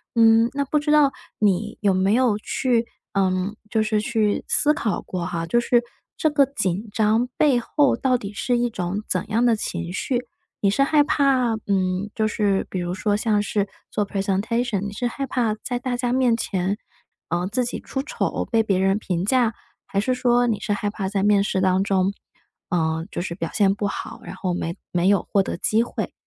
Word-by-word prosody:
嗯， 225 0 +5
那 280 0 -1
不 300 +2 +1
知 300 +1 -1
道 295 -2 +5 0.3
你 210 +1 +1
有 200 -3 +2
没 190 +3 +2
有 240 -4 +3
去 235 +1 0 0.3
呃， 190 +1 +1 0.2
就 220 - +1
是 215 -1 +1
去 215 -1 0
思 300 0 +3
考 220 -8 -2
过 180 -2 -4
哈， 170 -2 -3
就 240 - +1
是， 240 0 +3 0.4
这 310 - +2
个 285 -2 +4
紧 210 -5 -2
张 220 +3 +2
背 275 -5 +4
后 285 +3 +2
到 255 -1 +1
底 200 -2 -7
是 245 +3 0
一 240 0 +1
种 195 0 -3
怎 185 - -1
样 230 +3 +2
的 235 -2 +4
情 175 -4 -4
绪， 245 +5 -1 0.3
你 200 - +2
是 275 +7 +3
害 295 +1 +4
怕 265 -5 +2
嗯， 190 0 0
就 215 0 +1
是 205 -2 0
比 185 - -4
如 175 +1 -3
说 205 +2 0
像 210 -1 +1
是 205 -1 -1 0.2
做 210 - -1
presentation， 200 +3 -1
你 205 0 -4
是 240 +4 -2
害 275 +3 -3
怕 235 -4 0
在 245 -1 -2
大 250 -1 -2
家 245 -1 -1
面 255 -3 +3
前， 190 -1 -1 0.5
呃， 175 +2 -1
自 245 +5 0
己 245 - -4
出 270 0 -4
丑， - - -2
被 225 -1 +4
别 200 -4 +1
人 195 +2 +2
评 180 -4 -2
价？ 240 -1 +2 0.3
还 195 - -1
是 255 +4 0
说 245 -1 +2
你 215 -3 0
是 205 -1 -1
害 205 0 -1
怕 195 -3 -3
在 195 -1 -1
面 205 -1 +4
试 190 - -1
当 190 0 +3
中 195 0 +1 0.6
呃， 160 -1 0
就 - - -4
是 170 - -4
表 165 -1 -4
现 195 -2 +3
不 205 0 -1
好， - - -6
然 - - -8
后 180 -2 -2
没 170 -1 -3 0.2
没 175 +1 +1
有 200 -3 +2
获 200 - +4
得 - - -3
机 220 +4 +2
会， - - -5
210 Hz, 245 characters per minute, -23 LUFS, 195-245 Hz, 0.6 s, 嗯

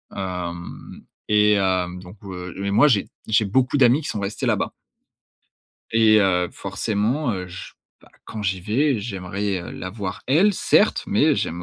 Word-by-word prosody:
hem, 90 -3 -6 0.2
et, 105 0 +4
hem, 90 -2 0
donc 90 +2 -12
heu, 90 -3 -7
mais 100 +1 -2
moi 145 +9 +5
j'ai 105 -9 +2 0.2
j'ai 110 0 +3
beaucoup 130 +7 +1
d'amis 130 +2 +5
qui 150 - -6
sont 105 - -3
restés 100 +1 -3
là-bas. - - 0 1.2
Et, 110 -1 +5
heu, 90 -2 +2
forcément, 115 +6 -1
heu, 90 -2 -4
je 90 +1 -9 0.3
bah - - -20 0.2
quand 110 - -7
j'y 95 -2 -1
vais 125 +7 +1
j'aimerais, 100 -1 -3
heu, 85 - -8
la 95 - -6
voir 95 -2 -6
elle, 175 +11 +4
certes, - - +2
mais - - +3
j'aime 85 +2 -3
100 Hz, 165 wpm, -22 LUFS, 90-110 Hz, 1.2 s, moi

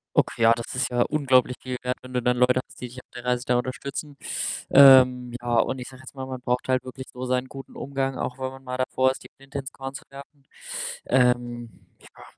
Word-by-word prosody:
Okay, 115 0 +4
das 115 +2 -6
ist 125 0 +1
ja 120 -1 +2
unglaublich 130 -4 +2
viel 130 -1 -4
wert, 125 0 -1
wenn 125 0 -12
du 125 - 0
dann 125 +1 +2
Leute 125 +1 +4
hast, - - -16
die 125 - -4
dich 125 +1 -10
auf - - -51
der 120 - -7
Reise 125 0 0
da 125 - +2
unterstützen. 140 +3 -4 0.5
Ähm, 130 -3 +7
ja, 120 0 -2
und 130 - 0
ich 125 - -6
sage 130 0 -12
jetzt 130 +1 -12
mal, 130 - -5
man 130 -1 -6
braucht 125 0 -1
halt 130 -1 +1
wirklich 130 0 -9
so 125 - -7
seinen 125 0 0
guten 135 0 -11
Umgang, 135 -1 -2
auch 125 - -3
wenn 130 0 -3
man 135 0 -13
mal 125 0 -4
davor 130 0 +2
ist, - - -9
die - - -13
Flinte 135 +1 -7
ins 135 0 -6
Korn 135 0 -7
zu 140 +3 -8
werfen. 140 0 -13 0.6
Ähm, 120 -1 +1 0.3
ja. - - -16
130 Hz, 235 wpm, -25 LUFS, 125-135 Hz, 0.6 s, Ähm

